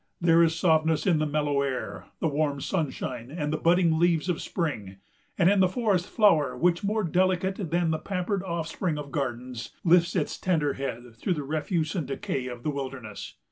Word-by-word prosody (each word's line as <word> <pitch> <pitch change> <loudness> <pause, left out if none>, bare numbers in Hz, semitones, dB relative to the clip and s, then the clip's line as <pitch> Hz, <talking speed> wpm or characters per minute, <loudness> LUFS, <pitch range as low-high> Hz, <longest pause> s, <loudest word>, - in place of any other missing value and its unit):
There 170 -1 +5
is 165 -1 +3
softness 160 -2 +2
in 175 -5 +3
the 155 - +1
mellow 145 -1 0
air, 130 -2 -3 0.2
the - - +2
warm 145 -1 0
sunshine, 130 -8 -3
and 150 0 -3
the - - 0
budding 170 0 +3
leaves 170 0 +2
of 175 - -1
spring; 105 - -3 0.4
and 175 - +4
in 200 +1 +4
the 185 - +5
forest 195 -3 0
flower, 170 -10 +3
which, 175 +1 +2
more 215 +2 0
delicate 185 +1 0
than 170 0 +1
the 160 - -1
pampered 195 0 -2
offspring 170 -2 -2
of 145 -1 -7
gardens, 125 -5 -4
lifts 175 +1 +4
its 160 -5 -1
tender 155 -6 +1
head 120 -3 -5
through 180 +9 -1
the 150 - -4
refuse 155 +2 -1
and 165 -8 -2
decay 135 -2 -3
of 120 -1 -7
the 150 - 0
wilderness. 130 -7 -6
160 Hz, 185 wpm, -27 LUFS, 140-180 Hz, 0.4 s, There